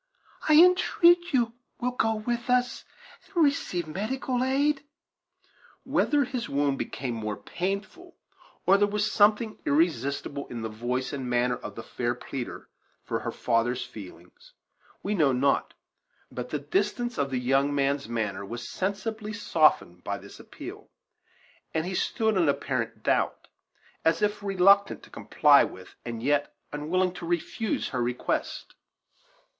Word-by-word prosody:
I 305 - +7
entreat 350 0 +5
you 240 -4 +2 0.3
will 250 +1 0
go 225 -3 +1
with 235 +3 -3
us, 250 0 +1 0.5
and 335 - +5
receive 235 - 0
medical 245 - -2
aid." 275 +2 +1 1.0
Whether 290 -1 +2
his 250 -2 -4
wound 140 -1 +1
became 130 -3 -3
more 110 -2 -3
painful, 200 - -4 0.5
or 195 +2 +5
there 205 - +4
was 210 +1 0
something 215 +1 +3
irresistible 140 -2 0
in 120 -2 -6
the 110 - -3
voice 120 +4 -3
and 130 -3 -4
manner 125 0 +2
of - - -8
the - - -7
fair 120 0 -2
pleader 125 0 -6 0.4
for - - -2
her - - -4
father's 120 +1 0
feelings, 90 -4 -13 0.5
we 205 - -1
know 155 -8 +3
not; 135 +2 +1 0.6
but 125 0 -5
the 150 - -1
distance 205 - -1
of 140 -1 +1
the 130 - -1
young 135 +3 +2
man's 140 -2 0
manner 110 -4 -2
was 120 +4 -6
sensibly 210 +3 -3
softened 155 - +2
by - - -2
this - - -13
appeal, - - -10 0.9
and 160 +1 +1
he 185 - -3
stood 220 +3 +1
in 170 -5 +3
apparent 125 -5 -2
doubt, - - 0 0.5
as 165 +3 +2
if 205 0 0
reluctant 200 0 +4
to - - -16
comply 145 -2 +5
with 95 0 -8
and 115 -1 -5
yet 145 +1 +1 0.2
unwilling 180 +5 0
to 170 - -7
refuse 175 +5 -1
her 125 - -2
request. 120 +1 -2
165 Hz, 145 wpm, -27 LUFS, -, 1.0 s, I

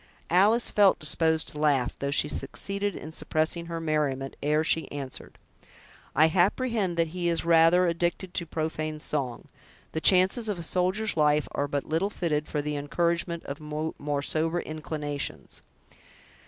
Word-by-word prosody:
Alice 210 +7 +4
felt 200 -2 +5
disposed 160 +1 0
to 150 - -9
laugh, 140 -5 +2
though 140 - -2
she 145 +1 +3
succeeded 200 +8 -3
in 155 - -8
suppressing 160 +1 -1
her 165 -1 -4
merriment, 150 -4 -1
ere 150 +2 +2
she 160 0 +1
answered: 140 -2 -7 0.8
"I 155 - +6
apprehend 190 +2 +1
that 165 -1 +1
he 175 +1 -2
is 165 -1 -1
rather 170 +2 +5
addicted 175 +2 -1
to 170 - 0
profane 155 -1 -3
song. 135 -6 -3 0.5
The 160 - -3
chances 190 +6 +5
of 205 - -2
a 170 - -6
soldier's 185 +6 0
life 150 -1 +2
are 145 - -1
but 145 0 -2
little 165 +6 0
fitted 155 -6 -2
for 150 -1 -2
the 150 0 -2
encouragement 170 +3 -1
of 140 +1 -6
more 150 -1 -3
sober 160 +3 0
inclinations." 150 -2 -5
160 Hz, 155 wpm, -27 LUFS, 150-175 Hz, 0.8 s, I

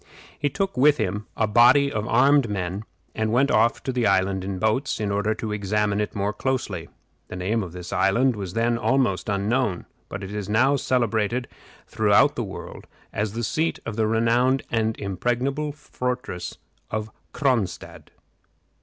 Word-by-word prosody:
He 145 - +1
took 195 +6 -2
with 145 +3 +5
him 105 -1 -2
a 110 - +3
body 125 +6 +5
of 105 -3 -2
armed 135 +1 +4
men, 100 +1 -3 0.3
and 110 0 -1
went 135 +4 +3
off 115 +2 +2
to 130 - -2
the 125 -3 +1
island 95 -1 +1
in 95 0 -4
boats, 110 +8 0
in 105 -2 -1
order 105 +2 0
to 110 - -4
examine 105 0 0
it 105 - -4
more 100 +1 -1
closely. 130 +2 -2 0.4
The - - -7
name 100 +5 -1
of 90 -4 -6
this 90 0 -7
island 120 +6 +3
was 95 -4 -5
then 115 +1 +1
almost 120 -7 +1
unknown, 100 0 0 0.2
but 100 0 -6
it 100 +1 -6
is 105 -1 -4
now 130 +6 +3
celebrated 120 -2 0 0.4
throughout 110 +7 +3
the 120 - -2
world 95 -2 -8 0.3
as 105 0 -2
the 120 +1 -3
seat 160 +9 0
of 115 - -4
the 110 -1 +1
renowned 120 +4 +2
and 110 -1 0
impregnable 120 +9 -1
fortress 125 -10 -5 0.3
of 110 0 -3 0.2
Cronstadt. 125 - -2
110 Hz, 165 wpm, -24 LUFS, 100-125 Hz, 0.4 s, with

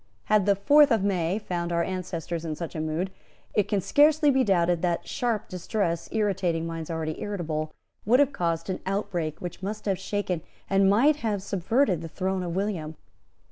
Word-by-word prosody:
Had 210 -2 +2
the 200 - +5
fourth 290 +9 +6
of 225 -6 +2
May 185 -2 +1
found 175 -5 -3
our 170 0 +1
ancestors 175 -2 -4
in 160 -2 -3
such 170 0 -6
a 155 - -2
mood, 160 +4 -2 0.4
it 210 - +2
can 200 -2 0
scarcely 295 - +4
be 265 -1 +3
doubted 175 -5 +2
that 175 -2 -1
sharp 235 -4 -1
distress, 180 -2 -2
irritating 185 -6 0
minds 165 -1 -5
already 160 -1 -3
irritable, 160 -6 -3 0.3
would 240 +5 +4
have 285 -1 +3
caused 170 -2 -1
an 185 - -3
outbreak 175 -6 -2
which 175 0 -6
must 210 +3 -5
have 195 -3 0
shaken 190 -3 -2 0.3
and 195 0 +4
might 275 +9 +4
have 210 -7 -2
subverted 195 - +1
the 165 - -6
throne 190 +2 -2
of 175 -1 -3
William. 180 -6 -2
185 Hz, 180 wpm, -26 LUFS, 170-210 Hz, 0.4 s, fourth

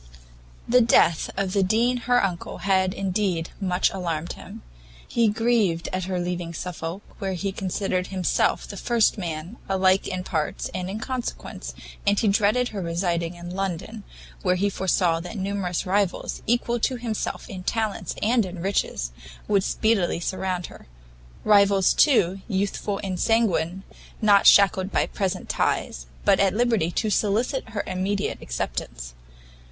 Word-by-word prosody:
The 250 +1 +5
death 200 -7 +4
of 190 -1 -1
the 200 - +3
Dean 230 +6 +2
her 245 0 +4
uncle 175 -3 -4
had, 190 -1 +3
indeed, 185 -3 -1
much 185 -1 +1
alarmed 170 -3 -3
him; - - -11 0.4
he 235 -1 +2
grieved 215 -6 +1
at 185 -1 -1
her 185 -1 -2
leaving 175 -1 -3
Suffolk, 175 +2 -5 0.2
where 195 -1 -2
he 195 +2 -2
considered 185 -1 -2
himself 185 -2 0
the - - -8
first 230 -3 +2
man, 170 +4 -5
alike 190 0 +3
in 185 -1 -3
parts 155 -4 -2
and 180 0 -3
in 200 - -4
consequence, 255 +2 -5 0.3
and 200 0 +4
he 220 - +1
dreaded 210 +5 +2
her 200 - -5
residing 170 0 -1
in 175 0 -8
London, 195 +3 -4 0.4
where 180 -2 +2
he 200 +2 +1
foresaw 180 -3 +1
that 180 +6 -7
numerous 190 -2 -2
rivals, 195 0 0
equal 240 +1 +1
to 255 +3 +1
himself 235 -3 -4
in 190 -2 -7
talents 220 +2 -2
and 230 +2 +3
in 185 -2 -6
riches, 170 - -1 0.4
would 200 -2 +3
speedily 210 -6 +1
surround 185 0 -2
her; - - -13 0.6
rivals, 200 -2 +5
too, 195 - +3
youthful 200 0 -1
and 185 -2 -3
sanguine, 190 -6 +1 0.4
not 205 -2 +5
shackled 190 -1 +6
by - - +2
present 190 -2 -3
ties, - - -1 0.2
but - - +5
at 195 0 +3
liberty 230 -7 +2
to 215 +4 -1
solicit 220 +5 0
her 215 -2 -3
immediate 195 +2 -2
acceptance. - - -4
195 Hz, 150 wpm, -24 LUFS, 180-210 Hz, 0.6 s, shackled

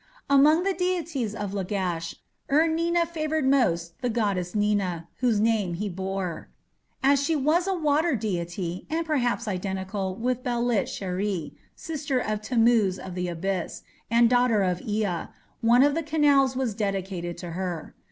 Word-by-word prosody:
Among 300 +5 +6
the 390 0 +1
deities 335 - -2
of 205 -3 -4
Lagash, 180 -4 -2 0.4
Ur 305 +3 +5
Nina 335 +1 +1
favoured 315 -3 -2
most 175 -11 +1
the 250 - 0
goddess 200 -6 -1
Nina, 200 -5 0
whose 240 -5 +2
name 210 -5 +1
he 205 +4 -3
bore. 190 -2 -4 0.5
As 280 +1 +4
she 320 +2 +1
was 310 +6 +2
a 385 - +1
water 310 -1 +2
deity, 180 -4 -3
and 325 +2 -1
perhaps 245 -6 0
identical 190 0 -3
with 250 +3 -1
Belit 240 -3 0
sheri, 190 -3 -3 0.2
sister 295 -4 -3
of 215 -4 -1
"Tammuz 225 -4 +3
of 185 - -8
the 180 0 -2
Abyss" 175 +1 -3 0.3
and 235 +1 +5
daughter 245 -4 +3
of 180 -1 0
Ea, 205 -5 -1 0.4
one 240 +2 +5
of 290 0 +4
the 330 - 0
canals 290 -4 +3
was 255 -4 -1
dedicated 190 -4 -3
to 170 0 -7
her. 175 -2 -4
220 Hz, 150 wpm, -26 LUFS, 190-280 Hz, 0.5 s, Among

